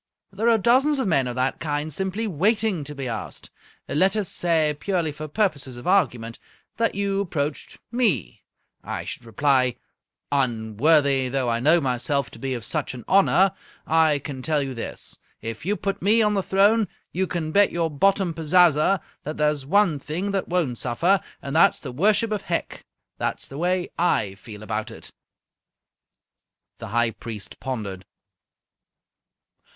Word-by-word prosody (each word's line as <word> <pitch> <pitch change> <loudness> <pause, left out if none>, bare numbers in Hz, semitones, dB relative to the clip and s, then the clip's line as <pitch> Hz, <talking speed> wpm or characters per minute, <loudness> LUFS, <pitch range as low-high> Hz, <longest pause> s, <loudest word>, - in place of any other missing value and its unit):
There 220 +4 +1
are 230 - +5
dozens 260 +7 +3
of 265 - 0
men 135 -7 +2
of 120 - -4
that 130 +2 -1
kind 150 0 -2
simply 190 +6 -2
waiting 205 0 +1
to 150 +1 -7
be 135 -2 -4
asked. 115 -3 -6 0.4
Let 185 +9 +2
us 210 -3 0
say, 160 -3 +1
purely 175 -5 -1
for 155 +1 -7
purposes 150 - -1
of 120 - -10
argument, 125 -12 +1 0.4
that 230 0 +1
you 200 0 0
approached 150 -6 -3
me. 185 - 0 0.4
I - - -4
should 120 - -7
reply, 130 +1 +2 0.6
'Unworthy 135 +2 +2
though 130 -1 0
I 115 0 +1
know 155 +7 +4
myself 135 0 -1
to - - -11
be 135 -1 -2
of 115 -3 -6
such 130 - -2
an 120 - -10
honour, 195 0 +4 0.3
I 160 -2 +3
can 140 -2 -7
tell 150 +1 0
you 135 -1 -4
this. 115 - -5 0.2
If 115 +7 -6
you 205 - +2
put 195 -1 -3
me 215 +5 +4
on 210 0 +2
the 195 - +1
throne, 205 +3 +3 0.2
you 185 +2 -1
can 160 -1 -3
bet 205 +4 +4
your 165 -2 -1
bottom 190 +3 +2
pazaza 165 +2 +3 0.2
that 155 +2 -5
there's 150 -3 0
one 190 -4 +3
thing 175 +8 -3
that 195 -1 -1
won't 165 -10 -1
suffer, 170 +11 +2 0.2
and 140 +2 -4
that 165 - +6
is - - -8
the 135 - -7
worship 210 - +2
of 210 -2 -1
Hec!' 170 -3 -3 0.4
That's - - -2
the 140 - -9
way 180 +1 0
I 105 - +1
feel 105 +1 -11
about 110 0 -3
it." - - -10 1.7
The - - -7
High 115 +2 +1
Priest 105 -3 -8
pondered. 105 -8 -5
155 Hz, 165 wpm, -24 LUFS, 130-195 Hz, 1.7 s, that